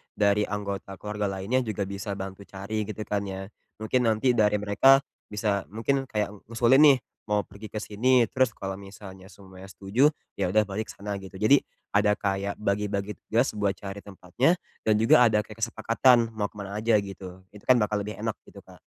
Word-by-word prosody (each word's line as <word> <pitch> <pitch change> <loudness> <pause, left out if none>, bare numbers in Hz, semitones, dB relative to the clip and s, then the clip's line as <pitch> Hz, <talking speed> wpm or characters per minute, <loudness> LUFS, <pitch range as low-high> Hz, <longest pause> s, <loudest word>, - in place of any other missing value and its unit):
dari 105 0 +2
anggota 100 -1 -5
keluarga 105 +1 -3
lainnya 95 +6 -1
juga 110 -5 -2
bisa 100 +1 -5
bantu 95 0 -8
cari 100 +2 -4
gitu 110 0 -5
kan 100 -1 -2
ya. 95 0 -5 0.3
Mungkin 115 +3 0
nanti 110 +3 +3
dari 105 -3 +3
mereka 105 +7 +4 0.2
bisa 105 -4 -2
mungkin 135 - -1
kayak 105 -3 -2 0.2
ngusulin 120 +3 +4
nih 145 -3 +8 0.3
mau 105 -1 +1
pergi 100 +2 -11
ke 110 - -5
sini, 125 +4 +3
terus 130 -4 +1
kalau 95 0 -5
misalnya 95 -1 -12
semuanya 95 -1 -14
setuju, 100 +9 +2 0.3
ya - - +1
udah 105 +4 +3
balik 105 +1 -3
sana, 100 0 -5
gitu 95 0 -10
jadi 125 +7 +6 0.3
ada 105 0 +3
kayak 100 0 -2
bagi-bagi 100 0 -2
tugas 120 +4 +2
buat 100 -1 +1
cari 100 0 -8
tempatnya 100 - 0 0.3
dan 110 - +4
juga 120 +2 +6
ada 105 -2 +3
kayak 105 +1 -13
kesepakatan 115 +1 +3
mau 105 - 0
ke - - -7
mana 100 0 -6
aja 110 +2 +1
gitu, 95 -2 -9
itu 105 -1 -16
kan 125 -3 +5
bakal 105 0 0
lebih 105 - -5
enak 110 -1 -2
gitu, - - -14
Kak. - - -17
105 Hz, 185 wpm, -26 LUFS, 100-110 Hz, 0.3 s, nih